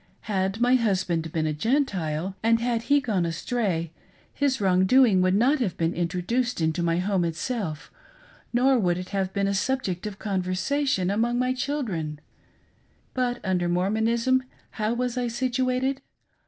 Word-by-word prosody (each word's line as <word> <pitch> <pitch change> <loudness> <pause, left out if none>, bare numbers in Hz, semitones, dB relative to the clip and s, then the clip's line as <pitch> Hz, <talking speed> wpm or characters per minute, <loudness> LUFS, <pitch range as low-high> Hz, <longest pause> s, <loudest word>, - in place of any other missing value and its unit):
Had 195 0 -1
my 245 +1 +3
husband 185 -9 +1
been 160 -1 -1
a 155 - 0
Gentile, 190 - -1
and 230 +1 +3
had 235 -1 0
he 285 0 +6
gone 205 -8 0
astray, 170 -1 -1 0.4
his 275 -3 0
wrong 190 -2 +3
doing 240 -6 +5
would 185 +1 +3
not 265 +8 +3
have 200 -9 -1
been 165 +1 0
introduced 180 +9 -1
into 160 +1 0
my 170 0 +1
home 185 0 +1
itself, 165 - -3 0.6
nor 255 +1 +3
would 175 -4 +1
it 180 0 -6
have 195 -2 -1
been 200 0 0
a 200 - 0
subject 200 -3 -1
of 200 -2 -7
conversation 195 +3 0
among 235 +4 +1
my 255 +1 +1
children. 215 - -3 0.9
But, 245 -1 -1
under 180 -2 0
Mormonism 225 +8 +1 0.3
how 215 +2 -1
was 250 0 -1
I 245 - -1
situated 255 +2 0
205 Hz, 155 wpm, -25 LUFS, 180-250 Hz, 0.9 s, he